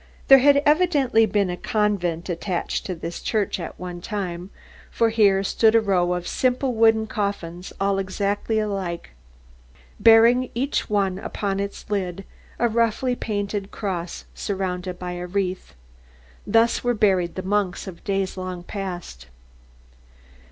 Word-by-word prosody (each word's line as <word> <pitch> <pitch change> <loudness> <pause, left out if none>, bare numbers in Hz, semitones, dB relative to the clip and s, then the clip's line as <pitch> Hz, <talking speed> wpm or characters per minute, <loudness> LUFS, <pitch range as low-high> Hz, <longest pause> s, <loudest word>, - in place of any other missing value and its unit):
There 270 0 +10
had 280 +2 +5
evidently 290 -8 +3
been 200 -2 +1
a - - -3
convent 180 -5 -1
attached 175 0 -3
to 185 - -3
this 170 +1 -6
church 210 -4 -1
at 170 - -7
one 180 -1 -6
time; 185 -3 -4 0.4
for 230 - +2
here 200 -3 +3
stood 220 +3 +3
a - - +7
row 180 -4 +1
of 180 0 -4
simple 255 0 0
wooden 225 -1 +4
coffins 195 -5 -4
all 195 0 +1
exactly 200 +3 -1
alike, 195 - -3 0.9
bearing 230 +3 +6
each 270 +4 -1
one 195 -3 0
upon 195 -1 -3
its 200 0 -5
lid 195 -2 -2 0.3
a 240 - +2
roughly 235 +2 +1
painted 205 -3 -3
cross 180 -5 -4
surrounded 185 -2 -3
by 180 0 -5
a 180 0 -5
wreath. 185 - -3 0.7
Thus 230 +1 +3
were 245 0 +1
buried 190 -5 +2
the 185 - -4
monks 200 -1 -1
of 185 -4 -10
days 195 -1 -1
long 185 -1 -5
past. 175 - -6
200 Hz, 140 wpm, -23 LUFS, 180-225 Hz, 0.9 s, There